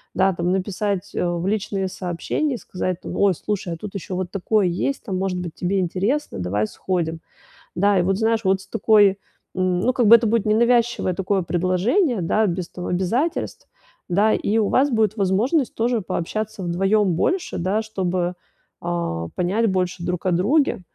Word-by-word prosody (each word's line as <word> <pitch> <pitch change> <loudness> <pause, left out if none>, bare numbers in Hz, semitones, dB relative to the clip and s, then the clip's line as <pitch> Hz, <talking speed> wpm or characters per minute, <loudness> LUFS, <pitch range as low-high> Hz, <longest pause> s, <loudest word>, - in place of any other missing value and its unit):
да, 190 0 +3
там, 175 +1 -1
написать, 190 0 -2
а, 175 -1 0
в 175 +3 -3
личные 200 -2 -1
сообщения, 185 - -2
сказать, 185 -4 -4
там, - - -6
ой, 200 -2 +4
слушай, 190 -3 -3
а - - -6
тут 200 +4 -8
ещё 190 -1 -5
вот 185 -1 -3
такое 205 +1 +1
есть, 255 +10 -2
там, 190 -4 -2
может 185 -1 -1
быть, 175 -3 -6
тебе 190 +2 0
интересно, 195 - -1
давай 100 +4 -1
сходим. 165 -3 -3 0.5
Да, 200 +1 +3
и - - +2
вот, 190 +2 +1
знаешь, 225 0 +1
вот 190 0 +2
с - - -16
такой, 205 -2 +4 0.4
м, 185 -1 +1
ну, 255 +3 +2
как 240 -4 +2
бы 230 - +10
это 230 0 +3
будет 225 -1 +1
ненавязчивое 235 -2 +2
такое 195 0 0
предложение, 185 - +1
да, 215 +5 +2
без 175 0 -3
того 180 - -7
обязательств, 225 - -1 0.4
да, 205 +5 +3
и 215 - 0
у 210 - +2
вас 275 +3 +3
будет 220 -2 +2
возможность 225 - +1
тоже 235 0 0
пообщаться 210 +3 -4
вдвоём 190 +3 +2
больше, 360 - -1
да, 190 +5 0
чтобы, 185 -4 -2 0.5
а, 170 - -2
понять 200 +6 +1
больше 180 -1 -1
друг 180 0 -3
о 185 - +2
друге. 210 - +2
190 Hz, 180 wpm, -22 LUFS, 180-220 Hz, 0.5 s, бы